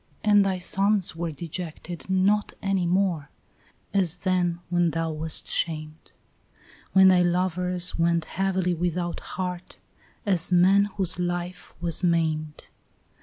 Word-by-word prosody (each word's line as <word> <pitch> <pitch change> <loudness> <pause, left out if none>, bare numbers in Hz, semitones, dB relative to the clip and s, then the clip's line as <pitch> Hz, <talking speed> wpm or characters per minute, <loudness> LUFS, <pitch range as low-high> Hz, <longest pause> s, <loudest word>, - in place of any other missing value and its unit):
And 205 -1 +5
thy 190 -1 0
sons 195 +1 +1
were 170 0 -3
dejected 170 +2 -7
not 195 +3 +2
any 195 -3 0
more, 175 -5 0 0.6
as 180 -4 +2
then 180 -2 0
When 175 -1 +2
thou 165 +1 -2
wast 155 0 -1
shamed; 155 -1 -3 0.8
When 190 0 +7
thy 180 -1 +5
lovers 180 0 0
went 170 -1 +2
heavily 190 -2 -1
without 175 0 -2
heart, 180 -1 -6 0.5
as 185 -4 +2
men 190 +3 +5
Whose 185 -2 0
life 175 0 -4
was 170 +1 -2
maimed. 160 -3 -1
180 Hz, 120 wpm, -25 LUFS, 170-185 Hz, 0.8 s, When